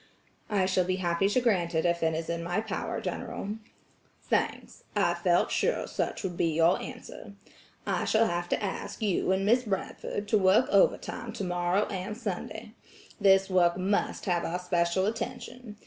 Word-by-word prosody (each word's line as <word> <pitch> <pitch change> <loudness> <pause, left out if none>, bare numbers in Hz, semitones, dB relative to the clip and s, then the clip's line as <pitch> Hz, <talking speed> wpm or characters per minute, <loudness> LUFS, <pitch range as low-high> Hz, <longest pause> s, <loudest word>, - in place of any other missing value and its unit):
"I 200 -3 +2
shall 185 -1 +2
be 185 +1 0
happy 185 +1 +1
to 230 - +2
grant 180 -8 +1
it 160 - +1
if 170 0 +1
it 160 -1 +1
is 160 0 -3
in 170 0 -2
my 175 +4 -1
power, 220 0 -3
General." 200 - -4 0.7
"Thanks, - - -2
I 185 -4 +3
felt 175 0 +2
sure - - +1
such - - -3
would 180 -3 -3
be 170 - +1
your 165 +3 +3
answer. 245 -5 -9 0.5
I - - 0
shall 225 +1 +3
have 175 -3 -2
to - - 0
ask 205 +3 -4
you 195 -2 +1
and 190 +1 +1
Miss 235 +4 +4
Bradford 205 -1 -4
to 215 - +4
work 195 +6 +5
overtime - - +1
tomorrow 180 +1 0
and 195 +2 -5
Sunday. 215 0 -5 0.5
This 195 -1 +5
work 180 -2 +3
must 195 +2 -1
have 175 -2 +1
our 170 - -2
special 180 0 +1
attention. 235 0 -5
190 Hz, 170 wpm, -28 LUFS, 175-210 Hz, 0.7 s, work